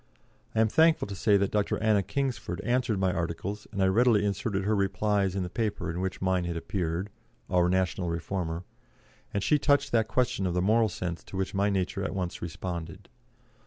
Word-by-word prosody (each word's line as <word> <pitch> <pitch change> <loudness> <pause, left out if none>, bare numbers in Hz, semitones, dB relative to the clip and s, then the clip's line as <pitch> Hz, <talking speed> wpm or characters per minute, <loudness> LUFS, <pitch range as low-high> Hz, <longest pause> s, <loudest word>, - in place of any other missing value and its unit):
I 110 - +4
am 110 - +4
thankful 160 +5 +4
to - - -4
say 100 +1 +3
that 100 0 0
Dr. 105 -1 +1
Anna 110 -2 +3
Kingsford 105 -3 -2
answered 125 -3 +1
my 95 -1 +2
articles, 85 +5 -3
and 100 -3 0
I - - +5
readily 105 +2 +4
inserted 100 0 -1
her 105 +2 +1
replies 100 0 +1
in 95 - 0
the - - -3
paper 105 -6 -2
in 85 +2 -4
which 95 0 -3
mine 95 -1 +1
had 85 -1 -3
appeared 90 +2 -2 0.4
our 90 -1 +3
National 95 -1 0
Reformer 85 0 -3 0.7
and 100 - -1
she 150 +5 +3
touched 145 0 +2
that 110 -2 +2
question 110 -4 0
of 90 - -2
the - - +2
moral 110 +2 +3
sense 85 -2 -4
to 95 - -7
which 95 0 -2
my 100 +1 +2
nature 95 +1 -1
at 100 - -3
once 90 -2 -3
responded. 85 -1 -6
95 Hz, 200 wpm, -28 LUFS, 90-105 Hz, 0.7 s, I